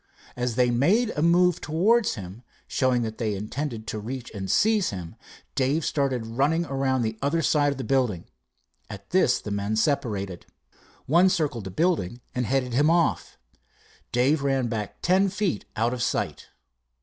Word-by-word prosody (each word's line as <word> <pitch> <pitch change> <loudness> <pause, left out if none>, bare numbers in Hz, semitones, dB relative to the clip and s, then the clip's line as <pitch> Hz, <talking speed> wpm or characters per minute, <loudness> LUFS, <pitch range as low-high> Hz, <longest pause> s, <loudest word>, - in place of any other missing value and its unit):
As 125 -2 -2
they 125 -1 +3
made 195 - +2
a 150 - -3
move 175 +1 +3
towards 210 +9 +2
him, 95 +2 -9 0.3
showing 125 -2 +1
that 110 -1 -5
they 110 -3 -1
intended 110 +3 -4
to 110 - -4
reach 120 +3 -6
and 95 -2 -5
seize 215 - +3
him, 90 -4 -7 0.4
Dave 140 +4 0
started 135 -5 0
running 140 +9 +1
around 135 -3 0
the 110 0 -3
other 155 +4 0
side 145 -2 +3
of 140 - -5
the 135 - -4
building. 125 -11 0 0.6
At 100 -1 -10
this 180 -9 +3
the 105 - -7
men 100 +1 -1
separated. 105 - -1 0.6
One 175 +6 +5
circled 150 - -1
the - - -4
building 140 - 0
and 125 -2 -1
headed 130 -2 0
him 145 +5 +3
off. 170 0 +1 0.7
Dave 135 +5 +2
ran 135 -3 0
back 110 -3 -5
ten 190 +3 +3
feet 195 - -2
out 115 +3 +1
of 125 - -4
sight. - - -2
130 Hz, 165 wpm, -25 LUFS, 110-160 Hz, 0.7 s, One